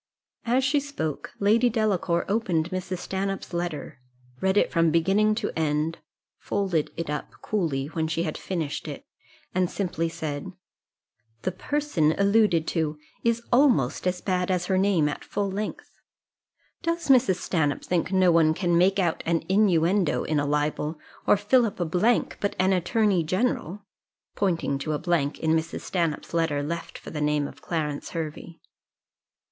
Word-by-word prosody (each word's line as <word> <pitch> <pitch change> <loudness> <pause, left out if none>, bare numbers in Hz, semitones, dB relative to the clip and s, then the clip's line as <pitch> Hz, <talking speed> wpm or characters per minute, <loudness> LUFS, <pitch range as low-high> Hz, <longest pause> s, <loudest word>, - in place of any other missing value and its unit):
As 250 +3 +2
she 275 +3 +3
spoke, 275 - -4
Lady 225 +5 +4
Delacour 200 -6 +1
opened 185 -6 0
Mrs. 185 0 -3
Stanhope's 195 0 -4
letter, 170 -6 -4 0.4
read 190 +1 +2
it - - +3
from 165 -2 +3
beginning 195 +7 +3
to 215 -2 -2
end, 155 +1 0 0.4
folded 185 -6 -1
it 165 - -3
up 150 -1 -4
coolly 160 -10 -1
when 160 +2 -2
she 165 +1 -1
had - - -3
finished 160 -6 -4
it, - - -7 0.5
and 185 -1 +1
simply 175 -4 -2
said, 155 -3 -5 0.9
"The 185 - 0
person 185 - 0
alluded 200 -5 +3
to 155 -3 -1 0.3
is 235 0 +1
almost 240 - +3
as 180 0 -1
bad 180 -1 0
as 180 -1 0
her 190 0 +1
name 190 -6 +3
at 145 - -4
full 200 -1 -2
length: 205 +2 -5 0.9
does 335 -2 -2
Mrs. 255 -7 +5
Stanhope 160 -5 -1
think 180 +1 0
no 185 -2 +4
one 160 -1 +4
can 175 -2 +2
make 190 +2 +4
out 175 -4 +1
an 165 -1 +2
inuendo 185 -3 +3
in 155 -1 0
a 145 - 0
libel, 150 +1 -1 0.3
or - - +6
fill 225 +5 +3
up 215 -5 -3
a 175 - +1
blank, 190 +9 +1
but 200 - -1
an 190 +1 +3
attorney 190 0 +2
general?" 195 +1 -1 0.5
pointing 165 -8 0
to 155 +2 -2
a - - 0
blank 160 -4 0
in 160 - +1
Mrs. 160 0 -1
Stanhope's 170 -4 -2
letter, 160 -4 +1
left 170 +3 -5
for - - -10
the 150 - -4
name 150 -1 +1
of - - -13
Clarence 150 -4 -3
Hervey. 165 0 -6
175 Hz, 160 wpm, -26 LUFS, 160-200 Hz, 0.9 s, or